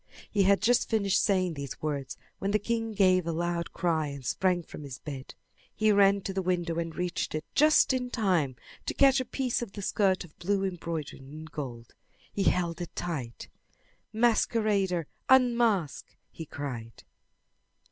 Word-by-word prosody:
He 205 Hz, -, +2 dB
had 195 Hz, +1 st, +4 dB
just 245 Hz, +2 st, +3 dB
finished 200 Hz, -4 st, +2 dB
saying 185 Hz, -4 st, +1 dB
these 140 Hz, -3 st, -6 dB
words 140 Hz, -4 st, -3 dB, 0.2 s
when 195 Hz, -, -1 dB
the 210 Hz, -, +3 dB
king 225 Hz, +1 st, -2 dB
gave 185 Hz, -4 st, +3 dB
a -, -, 0 dB
loud 170 Hz, +1 st, -2 dB
cry 160 Hz, -4 st, 0 dB
and 140 Hz, -2 st, -8 dB
sprang 180 Hz, +7 st, +1 dB
from 155 Hz, -, -10 dB
his 140 Hz, -4 st, -7 dB
bed. 140 Hz, -3 st, -8 dB, 0.4 s
He 215 Hz, 0 st, +3 dB
ran 200 Hz, -1 st, +5 dB
to 195 Hz, -, -4 dB
the 190 Hz, -, -1 dB
window 175 Hz, -2 st, -1 dB
and 165 Hz, -1 st, -4 dB
reached 180 Hz, -3 st, -2 dB
it 155 Hz, -, -3 dB
just 305 Hz, -2 st, +5 dB
in 250 Hz, -1 st, -1 dB
time 180 Hz, -, +1 dB, 0.3 s
to -, -, -2 dB
catch 275 Hz, -1 st, +5 dB
a 255 Hz, -, -2 dB
piece 250 Hz, 0 st, -1 dB
of 220 Hz, -5 st, -6 dB
the 200 Hz, -, -6 dB
skirt 190 Hz, -1 st, +1 dB
of 165 Hz, -4 st, -16 dB
blue 195 Hz, +2 st, 0 dB
embroidered 170 Hz, -5 st, -4 dB
in 150 Hz, +4 st, -10 dB
gold. 125 Hz, -7 st, -7 dB, 0.4 s
He 195 Hz, -, -1 dB
held 175 Hz, -1 st, +1 dB
it 175 Hz, -, -7 dB
tight. 135 Hz, -10 st, -4 dB, 0.6 s
"Masquerader, 215 Hz, -6 st, +2 dB, 0.2 s
unmask!" 235 Hz, -, +3 dB, 0.2 s
he 160 Hz, -, -8 dB
cried. 120 Hz, -7 st, -7 dB
180 Hz, 165 wpm, -29 LUFS, 155-210 Hz, 0.6 s, ran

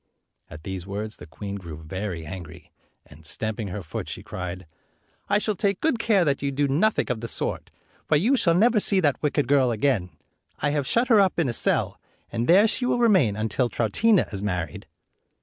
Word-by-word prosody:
At 75 Hz, +1 st, -11 dB
these 95 Hz, -1 st, -6 dB
words, 105 Hz, +2 st, -5 dB
the 75 Hz, -, -12 dB
queen 100 Hz, +7 st, -6 dB
grew 85 Hz, -5 st, -8 dB
very 85 Hz, +1 st, -5 dB
angry, 85 Hz, -1 st, -9 dB, 0.3 s
and, 75 Hz, +3 st, -16 dB
stamping 110 Hz, +7 st, -3 dB
her. 100 Hz, +1 st, -5 dB
foot, 80 Hz, -, -6 dB
she -, -, -5 dB
cried, 90 Hz, 0 st, -6 dB, 0.3 s
" -, -, -40 dB
I 200 Hz, -, +4 dB
shall 210 Hz, +1 st, 0 dB
take 200 Hz, 0 st, -1 dB
good 295 Hz, -7 st, +1 dB
care 205 Hz, -6 st, +3 dB
that 140 Hz, -2 st, 0 dB
you 140 Hz, 0 st, -1 dB
do 140 Hz, +1 st, 0 dB
nothing 160 Hz, +3 st, +1 dB
of 115 Hz, -3 st, -3 dB
the 115 Hz, -, -4 dB
sort, -, -, -3 dB, 0.4 s
for -, -, +3 dB
you 220 Hz, -, +3 dB
shall 170 Hz, -9 st, +3 dB
never 220 Hz, +4 st, +4 dB
see 195 Hz, -1 st, +3 dB
that 145 Hz, -6 st, +1 dB
wicked 145 Hz, -2 st, 0 dB
girl 135 Hz, -2 st, +3 dB
again. 110 Hz, -5 st, 0 dB, 0.5 s
I 145 Hz, -, 0 dB
have 145 Hz, -3 st, -1 dB
shut 235 Hz, +2 st, +1 dB
her 225 Hz, -3 st, +6 dB
up 195 Hz, -2 st, +2 dB
in 165 Hz, -6 st, +1 dB
a -, -, -2 dB
cell, -, -, +1 dB, 0.3 s
and 115 Hz, +1 st, -2 dB
there 195 Hz, +6 st, +6 dB
she 245 Hz, +3 st, 0 dB
will -, -, +1 dB
remain 190 Hz, -, +3 dB
until 110 Hz, +3 st, 0 dB
Troutina 185 Hz, -, +2 dB
is 100 Hz, -, -4 dB
married." 90 Hz, -7 st, -4 dB
125 Hz, 205 wpm, -25 LUFS, -, 0.5 s, her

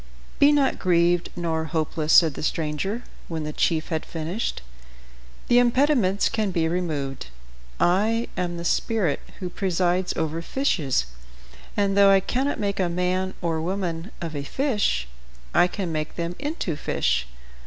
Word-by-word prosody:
"Be 285 Hz, +1 st, +7 dB
not 285 Hz, -2 st, +2 dB
grieved 175 Hz, -1 st, +2 dB
nor 165 Hz, -2 st, -1 dB
hopeless," 155 Hz, 0 st, -1 dB
said 160 Hz, -3 st, +7 dB
the -, -, -7 dB
stranger, 165 Hz, +9 st, -2 dB, 0.2 s
when 160 Hz, -2 st, -3 dB
the 150 Hz, 0 st, -4 dB
chief 160 Hz, 0 st, 0 dB
had 160 Hz, -1 st, -1 dB
finished. 165 Hz, -, -4 dB, 0.8 s
"The 245 Hz, -, +5 dB
impediments 245 Hz, -5 st, +3 dB
can 215 Hz, -2 st, 0 dB
be 170 Hz, -3 st, +1 dB
removed. 150 Hz, -, -2 dB, 0.5 s
I 215 Hz, +6 st, +2 dB
am 175 Hz, -1 st, -2 dB
the 170 Hz, -, -6 dB
spirit 195 Hz, -6 st, +1 dB, 0.2 s
who 185 Hz, -, -3 dB
presides 180 Hz, -1 st, 0 dB
over 160 Hz, +1 st, -1 dB
fishes, 165 Hz, -, 0 dB, 0.7 s
and 200 Hz, -1 st, +2 dB
though 200 Hz, 0 st, +7 dB
I 195 Hz, 0 st, +6 dB
cannot 260 Hz, +8 st, -1 dB
make 200 Hz, -1 st, -1 dB
a 180 Hz, -2 st, +2 dB
man 180 Hz, +2 st, -1 dB
or 165 Hz, -2 st, 0 dB
woman 175 Hz, 0 st, -3 dB
of 165 Hz, -2 st, -4 dB
a 145 Hz, -, -2 dB
fish, 205 Hz, -, 0 dB, 0.5 s
I 175 Hz, -, +5 dB
can 180 Hz, -2 st, -4 dB
make 155 Hz, -1 st, -3 dB
them 170 Hz, 0 st, -3 dB
into 285 Hz, -, -2 dB
fish. -, -, 0 dB
175 Hz, 150 wpm, -24 LUFS, 160-200 Hz, 0.8 s, Be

